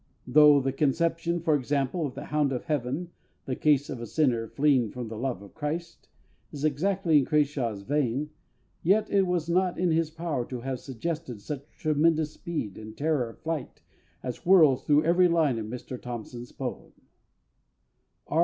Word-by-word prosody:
Though 145 Hz, +2 st, +7 dB
the 135 Hz, 0 st, 0 dB
conception, 165 Hz, +4 st, 0 dB
for 160 Hz, -2 st, +2 dB
example, 145 Hz, +3 st, 0 dB
of 130 Hz, -, -10 dB
The 140 Hz, +2 st, -6 dB
Hound 150 Hz, -2 st, +1 dB
of 125 Hz, -, -3 dB
Heaven 150 Hz, +4 st, -2 dB, 0.3 s
the 130 Hz, -, -2 dB
case 145 Hz, -1 st, +2 dB
of 125 Hz, -5 st, -6 dB
a 120 Hz, -, -5 dB
sinner 120 Hz, -5 st, +1 dB
fleeing 135 Hz, -3 st, +2 dB
from 120 Hz, 0 st, -6 dB
the 110 Hz, -, -6 dB
love 120 Hz, -2 st, -3 dB
of 100 Hz, -, -14 dB
Christ 160 Hz, +3 st, -5 dB, 0.4 s
is 145 Hz, +1 st, -4 dB
exactly 165 Hz, +2 st, +2 dB
in 135 Hz, -, 0 dB
CRASHAW'S 135 Hz, -9 st, 0 dB
vein, 145 Hz, +3 st, -1 dB, 0.5 s
yet 210 Hz, +5 st, +2 dB
it 195 Hz, -2 st, +3 dB
was 175 Hz, -3 st, 0 dB
not 180 Hz, +1 st, +1 dB
in 180 Hz, -1 st, +1 dB
his 160 Hz, -1 st, +1 dB
power 160 Hz, -5 st, -3 dB
to 125 Hz, -2 st, -6 dB
have 130 Hz, 0 st, -3 dB
suggested 135 Hz, -1 st, -5 dB
such 140 Hz, +6 st, -7 dB
tremendous 155 Hz, 0 st, +2 dB
speed 135 Hz, -, -5 dB
and 110 Hz, 0 st, -10 dB
terror 145 Hz, -5 st, 0 dB
of 115 Hz, -, -13 dB
flight 160 Hz, -4 st, -4 dB, 0.4 s
as 125 Hz, -1 st, -4 dB
whirls 160 Hz, -8 st, +5 dB
through 150 Hz, +1 st, +4 dB
every 180 Hz, +2 st, +5 dB
line 160 Hz, -8 st, +2 dB
of 110 Hz, -, -5 dB
Mr 125 Hz, +2 st, -7 dB
THOMPSON'S 120 Hz, 0 st, -7 dB
poem. -, -, -6 dB, 1.3 s
R. 160 Hz, -, 0 dB
145 Hz, 170 wpm, -27 LUFS, 125-165 Hz, 1.3 s, Though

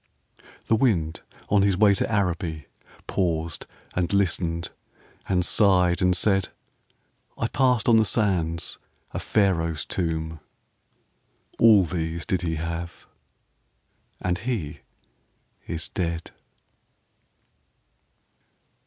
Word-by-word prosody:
The 115 Hz, -, +3 dB
wind 90 Hz, -10 st, +1 dB, 0.3 s
on 100 Hz, -1 st, +4 dB
his 100 Hz, -2 st, +2 dB
way 105 Hz, 0 st, +5 dB
To 100 Hz, -, -1 dB
Araby 85 Hz, -6 st, -1 dB, 0.4 s
Paused 85 Hz, -3 st, -2 dB, 0.3 s
and 90 Hz, 0 st, -1 dB
listened 85 Hz, -4 st, 0 dB, 0.6 s
and 90 Hz, -2 st, +2 dB
sighed 90 Hz, -4 st, +4 dB
and 90 Hz, -1 st, +3 dB
said, 95 Hz, -1 st, +2 dB, 0.9 s
"I 115 Hz, -, 0 dB
passed 125 Hz, -2 st, +2 dB
on 115 Hz, -2 st, +6 dB
the 110 Hz, -, +5 dB
sands 90 Hz, -7 st, 0 dB, 0.3 s
A -, -, -4 dB
Pharaoh's 85 Hz, -7 st, 0 dB
tomb: 80 Hz, -2 st, -2 dB, 1.2 s
All 110 Hz, -4 st, +7 dB
these 85 Hz, -1 st, -3 dB
did 95 Hz, -2 st, 0 dB
he 80 Hz, -2 st, -2 dB
have 85 Hz, +2 st, -5 dB, 1.1 s
and 90 Hz, 0 st, -1 dB
he 100 Hz, -, -3 dB, 0.9 s
is 85 Hz, 0 st, -3 dB
dead." 85 Hz, -4 st, -3 dB
90 Hz, 100 wpm, -25 LUFS, 85-100 Hz, 1.2 s, All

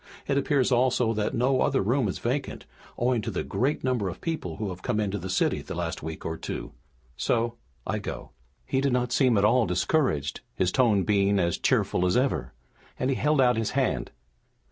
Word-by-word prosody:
It 140 Hz, -, +1 dB
appears 140 Hz, -1 st, +2 dB
also 125 Hz, -2 st, +2 dB
that 110 Hz, -1 st, -1 dB
no 130 Hz, +2 st, +2 dB
other 140 Hz, -7 st, +2 dB
room 120 Hz, +3 st, +1 dB
is 95 Hz, -, -3 dB
vacant, 130 Hz, +3 st, -3 dB, 0.3 s
owing 120 Hz, -1 st, +1 dB
to -, -, -4 dB
the -, -, -2 dB
great 140 Hz, +5 st, -1 dB
number 125 Hz, -7 st, 0 dB
of 85 Hz, -, -8 dB
people 155 Hz, -, -3 dB
who 105 Hz, -1 st, -3 dB
have 90 Hz, 0 st, -7 dB
come 115 Hz, -1 st, -1 dB
into 105 Hz, -1 st, -1 dB
the 95 Hz, -, -6 dB
city 95 Hz, -, +1 dB
in -, -, -11 dB
the -, -, -5 dB
last -, -, -3 dB
week 80 Hz, +1 st, -7 dB
or 80 Hz, 0 st, -3 dB
two. -, -, -5 dB, 0.5 s
So, 115 Hz, 0 st, 0 dB, 0.3 s
I -, -, -1 dB
go." -, -, -7 dB, 0.3 s
He 130 Hz, -, 0 dB
did 140 Hz, -2 st, +1 dB
not 125 Hz, -1 st, 0 dB
seem 125 Hz, -3 st, +3 dB
at 100 Hz, -, +4 dB
all 115 Hz, 0 st, +4 dB
discouraged, 90 Hz, -, 0 dB
his 90 Hz, 0 st, +1 dB
tone 115 Hz, -7 st, +3 dB
being 100 Hz, 0 st, +2 dB
as 85 Hz, -2 st, +1 dB
cheerful 90 Hz, -, +2 dB
as 90 Hz, -, +2 dB
ever, 130 Hz, +2 st, 0 dB, 0.5 s
and 130 Hz, +1 st, 0 dB
he -, -, +1 dB
held 150 Hz, +2 st, +1 dB
out 125 Hz, -3 st, +4 dB
his 115 Hz, -1 st, -1 dB
hand. -, -, 0 dB
120 Hz, 210 wpm, -27 LUFS, 100-130 Hz, 0.5 s, at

